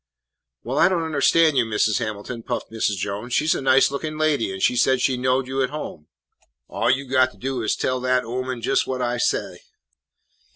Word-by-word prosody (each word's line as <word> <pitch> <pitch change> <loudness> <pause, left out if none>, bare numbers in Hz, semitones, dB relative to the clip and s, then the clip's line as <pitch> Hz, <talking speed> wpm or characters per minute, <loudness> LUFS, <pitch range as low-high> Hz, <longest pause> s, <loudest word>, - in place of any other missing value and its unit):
"Why, 130 +5 +2
I - - +5
don't 175 -3 0
understan' 160 0 +3
you, 125 - +4
Mis' 110 -1 +1
Hamilton," 110 +1 -5
puffed - - -5
Mrs. 110 -3 -1
Jones. 105 +6 -4
"She 150 - +2
's 155 - +3
a - - -3
nice 135 0 +4
lookin' 155 +2 -4
lady, 155 -9 +1
an' 95 - -6
she 125 - +2
said 130 +1 +3
she 130 +1 +1
knowed 130 +1 0
you 135 +1 -2
at 130 - 0
home." 140 - -7 0.6
"All - - -1
you 135 +2 +1
got 130 0 +3
to - - -21
do 130 +3 -3
is 110 - 0
to - - -9
tell 130 0 0
dat 130 0 +1
ooman 125 0 -4
jes' 135 +1 +1
what 130 -1 -2
I 120 0 -1
say." - - -1
130 Hz, 215 wpm, -22 LUFS, 115-135 Hz, 0.6 s, I